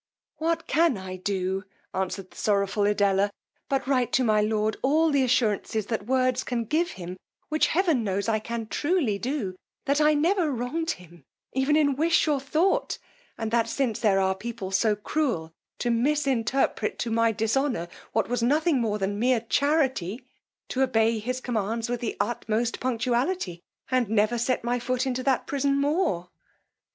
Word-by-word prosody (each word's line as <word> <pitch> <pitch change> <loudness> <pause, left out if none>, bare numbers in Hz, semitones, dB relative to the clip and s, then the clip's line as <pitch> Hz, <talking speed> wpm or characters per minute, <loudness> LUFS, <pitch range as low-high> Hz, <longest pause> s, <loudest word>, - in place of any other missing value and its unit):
What 330 +1 -1
can 325 -6 +3
I 190 -1 -6
do! 190 0 -2 0.3
answered 185 0 -3
the - - -17
sorrowful 200 0 +1
Edella, 205 -1 +2 0.4
but 270 -1 0
write 255 -3 +1
to 260 - +3
my 215 -3 +3
lord 215 0 +1
all 310 +4 +3
the 280 -1 +3
assurances 220 -4 +1
that 220 -1 -3
words, 255 0 +2
can 235 -2 -2
give 335 +8 0
him, 180 0 -7 0.3
which 310 0 +2
heaven 325 - +2
knows 200 0 -1
I 220 -1 +2
can 230 +1 -4
truly 290 - 0
do, 240 -8 -2 0.3
that 285 +1 +2
I 300 0 +5
never 335 +2 +2
wronged 270 +7 -2
him 175 -1 -16 0.3
even 265 +3 +2
in 290 -3 +3
wish 325 +3 +3
or 295 -2 +2
thought; 340 - +1 0.4
and 225 -1 -3
that 230 -1 +2
since 255 -6 -1
there 200 -4 +3
are 190 0 +2
people 195 -1 -6
so 210 +2 +2
cruel 210 - -1 0.3
to 240 - 0
misinterpret 265 -2 +1
to 235 - -3
my 230 0 +3
dishonour, 225 -2 0 0.2
what 225 -2 +1
was 245 0 -1
nothing 290 +3 +2
but 210 -3 0
mere 230 +4 +1
charity, 260 - 0 0.4
to 265 - -1
obey 225 -3 +2
his 255 +4 -3
commands 230 -1 -2
with 245 -1 -1
the 235 -2 -3
utmost 230 0 -1
punctuality, 245 - -1 0.3
and 255 -4 +2
never 220 +2 +2
set 245 +1 0
my 240 +1 0
foot 255 +2 -1
into 255 -1 -1
that 265 -1 +1
prison 280 0 +1
more? 280 - 0
240 Hz, 165 wpm, -26 LUFS, 210-275 Hz, 0.4 s, I